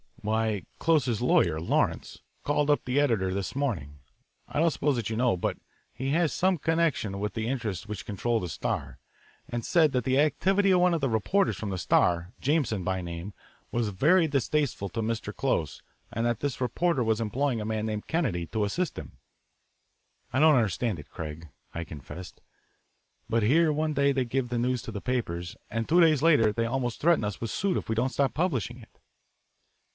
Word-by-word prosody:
"Why, 110 -2 0 0.2
Close's 140 -9 +2
lawyer, 85 -9 +3
Lawrence, 80 - -1 0.2
called 145 0 +1
up 145 - +2
the 130 +2 +1
editor 110 -10 +1
this 100 +3 -3
morning 85 - -2 0.5
I - - -3
don't 165 +1 +4
suppose 145 -2 0
that 115 -4 -2
you - - -1
know, 120 -2 +2
but 90 - -2 0.4
he 135 +1 -3
has 165 0 +2
some 185 0 +2
connection 160 -12 0
with 105 -1 -2
the 110 0 -3
interests 115 -7 -3
which 105 -3 -6
control 115 +3 -1
the 90 - -4
Star - - -3 0.5
and 120 -1 -4
said 160 -4 +4
that 125 -2 0
the 130 +3 +2
activity 195 +7 +2
of 180 - +5
one 180 0 +4
of 160 - -2
the 135 - +1
reporters 185 - +1
from 105 - -4
the 95 - -3
Star, 85 +1 +2
Jameson 130 - 0
by 95 +1 -1
name, 85 +3 -6 0.4
was 115 -3 0
very 160 - +4
distasteful 140 -6 0
to 115 - -3
Mr. 110 -2 -3
Close 85 - -1 0.3
and 115 0 -2
that 120 -2 0
this 140 -3 -3
reporter 130 +3 +1
was 110 0 +1
employing 125 +3 0
a - - -4
man 110 0 -2
named 105 -1 -4
Kennedy 120 - 0
to 110 -1 -1
assist 155 - -2
him. - - -11 1.2
"I 130 - +2
don't 155 0 +6
understand 110 - 0
it, 75 - -12
Craig;" 80 0 -7 0.2
I 85 - -3
confessed, 80 +3 -10 0.9
"but 115 -1 +2
here 155 +8 +4
one 155 +1 0
day 140 0 +3
they 130 -2 0
give 125 +1 -1
the 120 -1 -1
news 125 0 0
to 125 - -6
the 100 -2 -5
papers, 90 -9 -2 0.2
and 115 +1 -2
two 175 +2 +5
days 155 -5 +5
later 145 -10 +5
they 115 +1 0
almost 120 -1 -2
threaten 170 -5 +4
us 105 -1 -4
with 115 - -3
suit 195 -2 0
if - - -5
we 110 - 0
don't 120 +4 +1
stop 135 0 0
publishing 130 - -1
it." 115 - -18
120 Hz, 195 wpm, -28 LUFS, 105-145 Hz, 1.2 s, don't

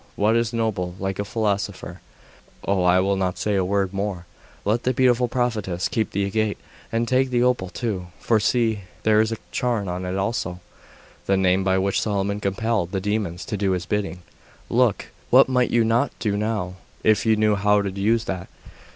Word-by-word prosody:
That 105 +2 +3
is 115 -1 +1
noble! 105 -7 -2
Like 95 0 -3
a - - +1
philosopher! 100 -4 -2 0.7
Oh, 100 -1 +2
I 90 +1 +5
will 100 +1 +2
not 95 -2 -1
say 105 - -1
a 95 -2 +2
word 100 0 0
more. 95 -3 -3 0.4
Let 110 +4 +1
the 130 0 0
beautiful 125 -1 +3
prophetess 110 -8 -1
keep 110 -2 -1
the 100 0 -1
agate, 110 +1 0 0.3
and 115 +1 0
take 130 +2 +2
the 120 -1 +2
opal 125 -7 +1
too; 95 -4 -3
for 110 -2 +2
see, 110 0 +1 0.2
there 110 0 +4
is 110 0 0
a 115 - -2
charm 115 -5 -1
on 90 +1 -3
it 90 +1 -2
also! 95 -3 -2 0.7
The 95 - +3
name 95 0 +2
by 95 0 +2
which 95 +1 +1
Solomon 100 -1 -1
compelled 105 -1 -1
the 95 - 0
demons 100 -3 -2
to 105 - -3
do 95 -1 +1
his 90 -2 -2
bidding. 90 -4 -2 0.5
Look! 120 -3 +2 0.2
What - - +7
might 125 -1 +2
you 120 -1 +3
not 115 +4 +2
do 105 -3 -1
now, 105 -4 -2 0.3
if 110 -2 +3
you 110 - +5
knew 105 0 +3
how 105 0 +3
to 100 - -2
use 110 +4 +1
that! 95 -5 -4
105 Hz, 195 wpm, -23 LUFS, 95-115 Hz, 0.7 s, What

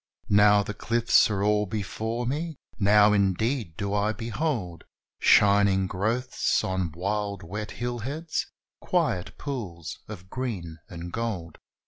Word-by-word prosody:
Now 105 0 +6
the 105 - -5
cliffs 115 +1 +3
are 100 -2 -1
all 105 0 +2
before 110 +4 -3
me 155 +4 -3 0.2
now, 105 0 +5
indeed, 100 - 0
do 100 -1 -2
I 105 +1 +1
behold 115 - -3 0.4
Shining 100 -1 +5
growths 110 +7 0
on 95 -3 -1
wild 100 +2 -2
wet 105 +5 -5
hillheads, 125 +7 -3 0.3
quiet 90 - -1
pools 95 - -5
of 95 -4 -9
green 95 -10 -5
and 85 0 -8
gold. 100 -8 -4
105 Hz, 120 wpm, -26 LUFS, 95-115 Hz, 0.4 s, Now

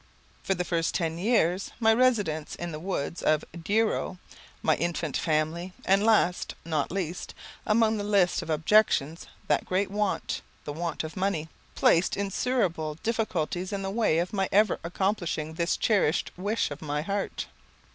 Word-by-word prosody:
For 195 - 0
the 180 0 -2
first 165 -2 0
ten 165 -1 -1
years, 190 -3 +2
my 225 -1 +5
residence 210 -11 +1
in 175 0 -5
the 155 - -5
woods 170 -2 -3
of 155 0 +2
Douro, 200 +3 0 0.5
my - - +4
infant 170 -3 -2
family, 165 +3 0
and 195 +2 +4
last, 215 -5 +2
not 155 -3 -1
least, 180 -2 -4 0.3
among 220 0 +3
the 205 - -2
list 200 -3 +2
of 165 - -8
objections, 160 -1 +2 0.2
that - - +2
great 190 +2 -1
want, 205 -1 -1 0.2
the 145 - -4
want 165 +1 -3
of 155 0 -7
money, 185 -5 -1 0.3
placed 170 +3 +3
insuperable 195 -6 0
difficulties 185 -6 -1
in 200 -1 -3
the 195 - -2
way 215 -7 +2
of 175 +4 -1
my 195 -2 0
ever 210 0 +3
accomplishing 170 -3 -1
this 170 +1 0
cherished 195 -8 +2
wish 205 0 -1
of 145 - -7
my 150 -1 -2
heart. 200 +3 -2
180 Hz, 155 wpm, -27 LUFS, 160-205 Hz, 0.5 s, my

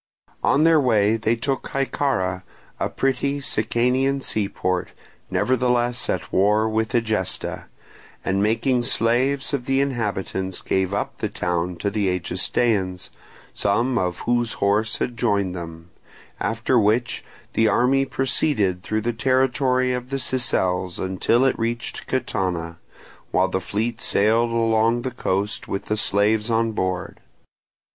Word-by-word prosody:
On 140 +3 +4
their 160 -2 +5
way 110 -4 +3
they 115 +1 +1
took 135 +3 -2
Hyccara, 130 -9 -1 0.4
a - - 0
petty 135 +1 0
Sicanian 130 +3 +1
seaport, 95 -6 -2 0.4
nevertheless 120 +4 +1
at - - -2
war 105 +3 +3
with 110 0 -1
Egesta, 110 -5 -1 0.6
and 95 +1 +1
making 115 +4 +2
slaves 125 +5 +1
of 130 -3 -1
the 135 0 +1
inhabitants 100 -8 -2
gave 95 -1 0
up 100 - -3
the - - -1
town 90 0 -2
to 100 +4 -2
the 105 -2 0
Egestaeans, 90 +1 0 0.4
some 115 +5 +1
of 90 -1 -2
whose 120 -1 0
horse 105 +2 +1
had 120 - -3
joined 100 -6 +1
them; 85 -1 -8 0.5
after 115 +2 +1
which 115 +3 +1 0.3
the 110 - +3
army 130 +5 +3
proceeded 130 -8 0
through 110 +3 -2
the 120 +2 -1
territory 130 +1 +2
of 125 0 -4
the 135 - -1
Sicels 95 -9 -1
until 95 +7 +1
it 135 - +1
reached 115 +1 -3
Catana, 90 -10 -2 0.5
while - - +2
the - - -1
fleet 110 +3 -2
sailed 115 +3 +3
along 115 0 +2
the 130 - -2
coast 100 -3 -2
with 100 - -3
the 105 - 0
slaves 105 +2 +2
on 115 0 +2
board. 95 -3 -3
115 Hz, 135 wpm, -23 LUFS, 100-125 Hz, 0.6 s, their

